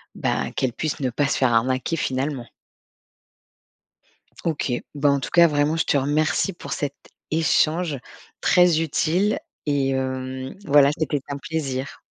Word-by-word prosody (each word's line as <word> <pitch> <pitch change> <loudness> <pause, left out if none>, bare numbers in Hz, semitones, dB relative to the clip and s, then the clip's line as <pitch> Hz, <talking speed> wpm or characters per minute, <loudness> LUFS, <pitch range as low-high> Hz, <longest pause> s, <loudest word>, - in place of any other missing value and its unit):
ben, - - -1
qu'elle 130 -2 0
puisse 155 +4 -3
ne 130 - +1
pas 145 +4 +1
se - - 0
faire 130 -3 +2
arnaquer, 130 +7 +1
finalement. 135 -2 -2 2.0
OK. 155 -5 -1 0.2
Bah, 145 0 +2
en 140 0 +2
tout - - -5
cas, 170 -1 +7
vraiment, 150 0 +1
je 165 - +1
te - - +1
remercie 150 +7 +1
pour 170 - -8
cet 140 -1 -2 0.4
échange 160 -1 +1 0.4
très 180 -3 +4
utile 165 +6 +1 0.3
et 140 -2 +1
hem, 130 0 -3
voilà, 145 -3 +5
c'était 150 -2 -1
un 140 - -3
plaisir. 140 -4 -4
145 Hz, 145 wpm, -23 LUFS, 130-160 Hz, 2.0 s, cas